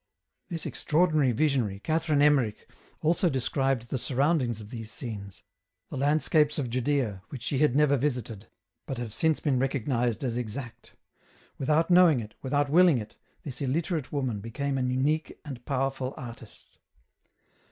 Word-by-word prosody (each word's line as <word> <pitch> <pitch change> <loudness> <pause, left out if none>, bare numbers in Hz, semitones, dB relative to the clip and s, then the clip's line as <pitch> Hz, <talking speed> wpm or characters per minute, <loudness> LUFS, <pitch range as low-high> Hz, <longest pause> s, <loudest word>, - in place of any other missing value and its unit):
This 165 -3 -4
extraordinary 155 -4 +2
visionary, 120 -7 +1
Catherine 155 +2 +1
Emmerich, 135 -8 +4
EN - - -26
ROUTE. - - -28 0.3
141 - - 0
also 175 +2 +3
described 135 -1 0
the 130 - -1
surroundings 130 -3 +1
of 105 0 -10
these 115 -2 -7
scenes, 105 - -7 0.5
the - - -5
land 145 +3 +2
scapes 150 -2 +3
of 130 -5 -2
Judaea, 125 -6 0
which 130 -4 -8
she 135 0 -1
had 150 -4 +3
never 145 -1 +4
visited, 125 -6 -3 0.4
but 135 - -4
have 120 -3 -5
since 160 +3 +2
been 135 -5 +1
recognized 125 -2 0
as 120 -2 -1
exact; 120 +1 -7 0.6
without 155 +5 +2
knowing 175 -6 +6
it, 105 -2 -8
without 145 +2 +1
willing 175 -3 +6
it, 110 -2 -7 0.3
this 140 -2 -6
illiterate 150 +2 -1
woman 130 -7 -1
became 135 +6 -3
an 125 0 0
unique 145 +5 0
and 130 -5 -7
powerful 135 -1 -1
artist. 115 -3 -11
135 Hz, 160 wpm, -28 LUFS, 120-150 Hz, 0.6 s, knowing